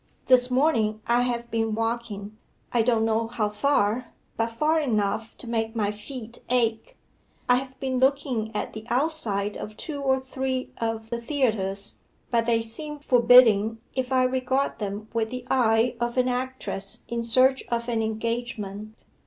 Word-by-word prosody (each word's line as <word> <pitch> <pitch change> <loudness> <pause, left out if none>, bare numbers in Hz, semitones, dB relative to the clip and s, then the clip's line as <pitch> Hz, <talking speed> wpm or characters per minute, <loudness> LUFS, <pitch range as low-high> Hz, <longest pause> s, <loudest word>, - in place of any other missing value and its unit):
This 250 -1 +5
morning 250 -6 +2
I 240 +1 +3
have 240 -1 -2
been 225 -1 0
walking 225 -2 -3 0.4
I 240 - +4
don't 225 -1 +2
know 225 0 +1
how 225 -3 -1
far 225 0 +1 0.2
but 230 0 -1
far 305 +7 +2
enough 220 -5 -1
to 245 - -10
make 225 -1 -1
my 210 -2 +1
feet 230 +2 -9
ache. 230 -3 0 0.5
I 245 - +5
have 260 0 -6
been 260 -1 -1
looking 260 -4 +1
at - - -3
the 220 - -7
outside 235 -7 0
of 215 +1 -7
two 290 -4 -5
or 265 -1 +2
three 260 0 -3
of 225 0 -3
the 235 0 -2
theatres, 215 -7 -1 0.3
but 230 -1 +2
they 230 -1 +3
seem 295 +7 -5
forbidding 235 -5 +5 0.2
if 260 0 -2
I 260 -1 +4
regard 260 0 0
them 205 0 -4
with 225 -1 0
the 250 0 -6
eye 235 -1 +3
of 240 +1 -2
an 255 0 +3
actress 250 -6 -3
in 235 0 -2
search 255 +3 +4
of 235 0 -1
an 230 -2 0
engagement. 220 -2 -4
235 Hz, 160 wpm, -26 LUFS, 220-255 Hz, 0.5 s, This